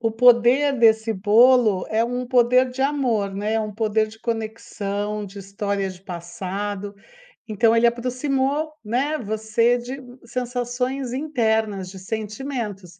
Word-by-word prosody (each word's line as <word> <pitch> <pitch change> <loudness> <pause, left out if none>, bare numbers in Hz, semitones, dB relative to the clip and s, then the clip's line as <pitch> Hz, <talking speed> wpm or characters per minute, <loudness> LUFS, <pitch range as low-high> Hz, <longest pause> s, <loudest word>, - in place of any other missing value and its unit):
o 225 -1 0
poder 245 +4 +5
desse 225 -1 +4
bolo 215 0 +4
é 220 +1 +2
um 245 +1 -3
poder 250 +1 +3
de 255 - -7
amor, 245 -8 0
né, 210 +2 -2
é 225 - +2
um 210 -2 -5
poder 220 0 +1
de 215 +1 -13
conexão, 210 -2 -3
de 200 +1 -10
história 200 0 -3
de 185 -1 -12
passado, 190 +3 -5 0.5
então 225 +2 +3
ele 230 - +4
aproximou, 265 +5 0
né, 275 +8 -1
você 220 +2 +1
de 245 +3 -6 0.3
sensações 250 +1 -3
internas, 220 -9 -1
de 190 - -10
sentimentos, 210 -3 -5
225 Hz, 135 wpm, -22 LUFS, 205-250 Hz, 0.5 s, poder